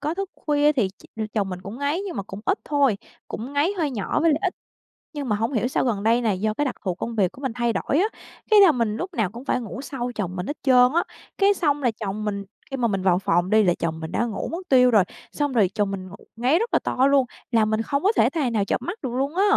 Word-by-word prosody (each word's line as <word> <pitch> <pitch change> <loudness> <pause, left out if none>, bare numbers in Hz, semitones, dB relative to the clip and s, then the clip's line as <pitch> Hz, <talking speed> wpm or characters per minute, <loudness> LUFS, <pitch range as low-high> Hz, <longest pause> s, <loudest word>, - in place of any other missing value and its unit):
có 305 +3 -2
thức 390 0 -4
khuya 295 0 +2
thì 240 -9 +1
ch 190 - -19 0.3
chồng 205 -3 0
mình 180 -1 -5
cũng 205 +6 -8
ngáy, 285 +5 0
nhưng 395 -8 -5
mà 200 - -2
cũng 195 +1 -9
ít 395 - +2
thôi, 280 -7 +2 0.3
cũng 245 +5 -6
ngáy 290 +7 +2
hơi 305 -3 +1
nhỏ 230 +4 -1
với 330 - +4
lại 295 - +2
ít. 375 - 0 0.6
Nhưng 285 -4 -4
mà 210 - +2
hông 225 +6 -1
hiểu 235 +1 +1
sao - - 0
gần 210 -5 -1
đây 230 +2 +3
này 210 -6 0
do 215 +1 0
cái 290 - -1
đặc 265 - -2
thù 185 -4 -1
công 230 +4 -5
việc 195 -5 +2
của 265 - -14
mình 265 -3 -2
thay 235 -1 0
đổi 285 - 0
á, 400 - +3 0.4
cái 425 - +8
là 390 -4 +8
mình 230 -5 -1
lúc 370 +7 -5
nào 220 - 0
cũng 240 +4 -10
phải 255 - +1
ngủ 235 +3 -6
sau 250 -3 -4
chồng 185 -3 -3
mình 180 0 -4
hết 295 - -4
trơn 250 -1 +6
á. 340 - +3 0.3
Cái 400 0 +4
xong 295 -6 0
là 245 - +3
chồng 210 0 -3
mình 200 -1 -2 0.3
khi 270 - -2
mà 240 -2 +1
mình 195 -3 -1
vào 180 -2 +3
phòng 175 -1 +1
đi, 215 +1 +5
là 180 -3 +3
chồng 160 -1 -2
mình 160 0 -6
đã 235 - 0
ngủ 220 -4 -4
mất 360 +2 -6
tiêu 250 -2 +6
rồi, 210 -4 +5 0.3
xong 290 -2 -1
rồi 210 -7 +3
chồng 205 -2 0
mình 190 -1 -5
ngủ 195 - -10 0.2
ngáy 255 +8 +2
rất 460 +3 -1
là - - +5
to 260 +2 +1
luôn, 280 -2 +4 0.3
làm 220 -3 +3
mình 220 +1 +1
không 280 +5 -1
có 400 - +4
thể - - +4
tài 290 -7 -1
nào 210 -3 +1
chợp - - -1
mắt 360 +6 -5
được 260 - -3
luôn 275 +5 -1
á! 385 - +3
245 Hz, 290 wpm, -24 LUFS, 210-290 Hz, 0.6 s, cái